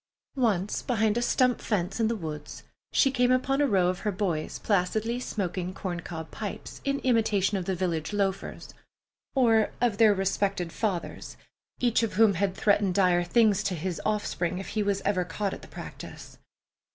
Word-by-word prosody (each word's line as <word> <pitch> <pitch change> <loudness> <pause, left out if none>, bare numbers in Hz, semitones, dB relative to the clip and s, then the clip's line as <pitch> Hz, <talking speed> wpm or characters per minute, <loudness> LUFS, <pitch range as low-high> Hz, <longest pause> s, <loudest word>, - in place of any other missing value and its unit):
Once 210 -7 +1
behind 220 -3 +1
a 240 - +1
stump 250 0 +2
fence 195 -1 -1
in 225 - +3
the 230 - 0
woods 155 -6 -7 0.3
she 270 - +4
came 250 -1 +2
upon 270 +2 +2
a 290 - +4
row 190 -6 +3
of 180 +1 -1
her 210 - -1
boys 180 -6 -2
placidly 215 +4 0
smoking 185 -6 -3
corn 180 -3 -4
cob 160 -1 -7
pipes, 205 -3 -6
in 275 0 0
imitation 215 -5 +2
of 185 -2 -2
the 190 - -1
village 165 -4 -2
loafers—or 210 +3 -1
of 230 -4 +1
their 220 -2 +7
respected 195 -2 -1
fathers, 195 -6 -3 0.4
each 240 -2 +2
of 225 - -1
whom 215 0 +5
had 190 +1 0
threatened 200 -3 +2
dire 180 -3 +4
things 210 +1 +3
to 190 -3 -1
his 175 +1 -3
offspring 195 -4 -1
if 190 - -6
he 215 - -1
was 200 -1 0
ever 195 -3 +2
caught 190 +3 -3
at - - -8
the - - -12
practice. - - -10
200 Hz, 175 wpm, -27 LUFS, 180-225 Hz, 0.4 s, their